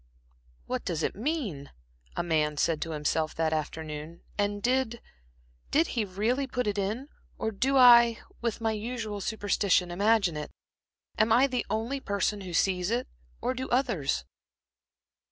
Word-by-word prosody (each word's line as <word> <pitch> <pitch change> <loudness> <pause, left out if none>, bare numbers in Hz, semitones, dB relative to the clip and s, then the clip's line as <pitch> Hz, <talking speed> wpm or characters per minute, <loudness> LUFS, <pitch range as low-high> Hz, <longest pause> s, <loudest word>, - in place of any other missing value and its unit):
"What - - -3
does 165 -2 -2
it - - 0
mean," 220 - -3 0.5
a - - -1
man 155 -3 +1
said 160 +1 +1
to 165 - -3
himself 155 +1 -1
that 160 -1 +1
afternoon, 155 +1 -5
"and 205 0 -1
did 250 -2 +1 0.9
really 225 +5 0
put 250 -1 -2
it 205 -1 -1
in, 215 +8 -2 0.3
or 220 - -1
do 265 +7 +1
I, 235 -2 +8 0.2
with 235 -1 -2
my 225 -1 +1
usual 220 -1 -4
superstition, 200 -3 +1
imagine 200 -2 +2
it? 150 - -5 0.7
Am 220 +1 +4
I 245 +4 +6
the 255 -3 -2
only 235 +6 -1
person 200 -2 -1
who 185 -2 -7
sees 180 +1 +1
it, 240 +2 -1 0.3
or 255 - 0
do 260 +1 -5
others?" 195 - 0
205 Hz, 145 wpm, -28 LUFS, 170-240 Hz, 0.9 s, I